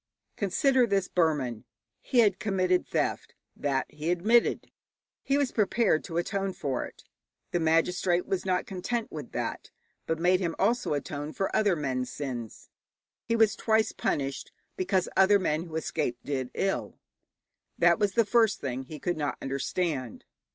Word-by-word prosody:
Consider 245 +6 +2
this 195 -3 +1
Burman. 145 -10 0 0.4
He 245 - +3
had 205 -4 +3
committed 185 -3 +1
theft. - - -2 0.2
That 135 -2 0
he 150 +2 -5
admitted. 215 +7 +2 0.5
He 275 - +1
was 280 -3 +1
prepared 210 -5 +2
to 165 -2 -4
atone 195 +2 -1
for 140 -9 -2
it. - - -13 0.5
The 175 - +1
magistrate 175 +2 +2
was 190 - -1
not 185 -1 0
content 220 +5 -3
with - - -7
that, - - -4 0.4
but 160 - 0
made 180 +2 +3
him 170 -3 -2
also 225 -6 +1
atone 145 +1 -4
for 195 - -2
other 205 -4 +3
men's 130 -4 -2
sins. 125 -6 -6 0.6
He 230 - +1
was 225 -1 +4
twice 220 -1 +2
punished, 135 -1 -2 0.2
because 185 0 0
other 195 +2 +6
men 165 -3 -1
who 160 -2 -9
escaped 150 -6 -2
did 130 -3 -2
ill. 195 0 -1 0.8
That - - +4
was 205 -2 +1
the 230 -1 +3
first 225 -1 +3
thing 130 -1 -4
he 155 +3 -8
could 175 +2 -2
not 145 -2 -2
understand. 135 - -2
180 Hz, 155 wpm, -28 LUFS, 150-200 Hz, 0.8 s, other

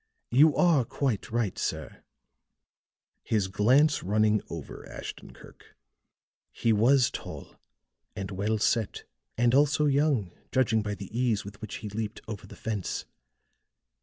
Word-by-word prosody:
You 145 +5 +6
are 170 -7 +4
quite 120 -2 -2
right, 115 -4 -1
sir," - - -4 1.2
his 105 -4 0
glance 125 +10 +3
running 105 +2 +2
over 85 -4 -8
Ashton - - -8
Kirk; - - -17 0.8
"he 115 -1 +1
was 120 +4 +4
tall - - -8 0.6
and 95 0 -5
well 105 +3 0
set, 110 0 0 0.3
and 120 +1 +3
also 145 +2 +4
young, 140 - +2 0.2
judging 115 -4 +2
by 105 -1 -3
the 100 +2 -9
ease 120 -5 +1
with 100 +2 -10
which 110 - -6
he - - -3
leaped 110 +1 -4
over 105 -1 -7
the - - -12
fence. 105 -5 -3
110 Hz, 135 wpm, -28 LUFS, 105-130 Hz, 1.2 s, You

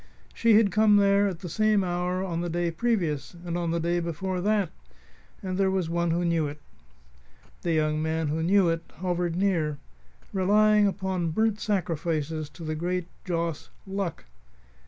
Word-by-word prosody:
She 230 -2 +4
had 210 -2 +5
come 215 -1 +5
there 200 0 +4
at 180 -4 -4
the 180 - -5
same 215 +3 +2
hour 180 +1 -1
on 170 -3 -2
the 175 - -2
day 170 0 -1
previous, 170 - -1
and 170 -1 -3
on 175 -1 -1
the 170 +1 0
day 170 +1 0
before 175 +2 -3
that; 205 -2 +1 0.7
and 185 0 -3
there 195 -1 +3
was 185 -3 -1
one 170 0 0
who 170 +2 +1
knew 165 -3 +1
it. 145 +1 -8 1.0
The 170 - 0
young 155 -1 +1
man 160 -1 -1
who 160 +2 -1
knew 190 +2 +4
it 165 0 0
hovered 175 0 -1
near, 170 -6 +1 0.6
relying 210 +2 +4
upon 190 -3 -1
burnt 215 +5 +1
sacrifices 160 -6 -2
to 165 +3 -11
the 155 0 -2
great 175 +3 -2 0.2
joss, 170 -3 -2 0.2
Luck. 195 -2 -4
175 Hz, 170 wpm, -27 LUFS, 165-195 Hz, 1.0 s, had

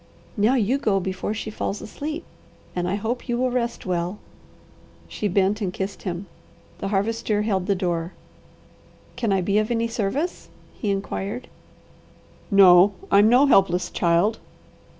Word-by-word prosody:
"Now 220 +4 +3
you 250 +3 +1
go 205 -7 +1
before 190 +3 -3
she 220 0 -5
falls 205 -1 -3
asleep, 305 +9 -6 0.5
and 180 0 -1
I 190 - 0
hope 230 +5 -4
you 240 - +1
will 255 0 +1
rest 240 -1 -2
well." 180 +1 -2 0.9
She 210 - -3
bent 195 +2 +1
and 190 -3 -1
kissed 190 +2 -5
him. 180 +1 -4 0.5
The 195 - -3
Harvester 210 +1 0
held 195 -3 -1
the 200 - +2
door. 175 -2 -2 1.0
"Can 235 -3 -1
I 195 -1 +2
be 200 +3 +2
of 215 - -1
any 230 -1 0
service?" 240 - -3 0.2
he 215 - -4
inquired. 200 +3 -3 1.0
"No, 195 -1 +7 0.2
I'm 205 +2 +6
no 250 +4 +6
helpless 180 -8 +3
child." 175 +6 +2
205 Hz, 150 wpm, -23 LUFS, 190-230 Hz, 1.0 s, No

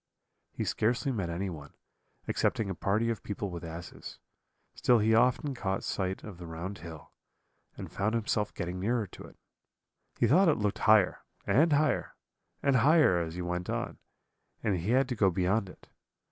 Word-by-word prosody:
He - - -3
scarcely 120 +5 0
met 100 -8 -2
anyone, 85 -5 -5 0.5
excepting 105 -4 0
a - - -1
party 105 +6 0
of 115 - -4
people 100 -1 -4
with 85 0 -6
asses; 85 +1 -8 0.6
still 125 - +3
he 110 +1 +3
often 125 +5 +3
caught 95 -6 -2
sight 95 -1 -2
of 100 -5 -9
the 85 - -8
round 85 +4 -6
hill, 80 -2 -10 0.7
and - - -7
found 110 +3 -1
himself 105 -2 0
getting 90 +1 -4
nearer 115 +3 0
to 95 - -12
it: - - -16 0.8
he - - +3
thought 170 - +5
it 150 - +2
looked 105 -1 -1
higher, 105 -4 +5 0.3
and 155 +5 +4
higher, 145 -2 +1 0.5
and 140 -2 +4
higher 145 - +5
as 80 -1 -4
he 90 - -4
went 90 0 -3
on, - - -3 0.6
and 100 -4 +1
he 90 +6 -3
had 130 +2 +3
to 125 - -1
go 100 -3 +4
beyond 95 +3 0
it. - - -16
100 Hz, 175 wpm, -30 LUFS, 90-120 Hz, 0.8 s, thought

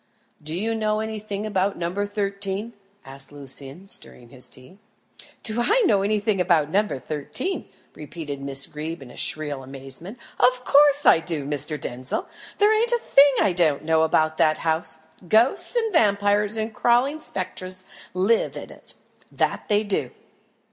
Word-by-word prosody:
"Do 155 +3 -2
you 225 +3 -1
know 215 -1 0
anything 215 -1 -4
about 200 -1 0
No. 170 0 -3
13?" 200 +1 -2 0.3
asked 135 0 -8
Lucian, 140 +5 -7
stirring 120 -10 -7
his 125 0 -4
tea. 130 +10 -14 0.6
"Do 225 +1 0
I 445 - +3
know 200 - +3
anything 205 -1 +1
about 165 -4 +2
No. 210 +3 +2
13?" 150 - -4 0.2
repeated 150 -2 -7
Miss 140 0 +2
Greeb 155 0 -6
in 125 - -13
shrill 145 -3 -1
amazement. 135 - -5 0.2
"Of 250 0 +3
course 290 0 +5
I - - +7
do, 160 -4 -3
Mr. 145 +1 -1
Denzil. 125 0 -3 0.3
There 420 +1 +5
ain't 450 +2 +2
a 480 - +3
thing 285 -11 +5
I 195 - +3
don't 160 -5 +2
know 160 0 +2
about 155 0 +2
that 155 0 +3
house. 160 0 -1 0.3
Ghosts 230 - +3
and 450 -3 0
vampires 205 - +2
and 220 0 -3
crawling 245 +7 +2
spectres 185 -6 -3 0.3
live 200 +5 +2
in - - -8
it - - -13 0.4
that - - -1
they 210 0 +2
do." 205 -2 -1
190 Hz, 155 wpm, -24 LUFS, 150-220 Hz, 0.6 s, I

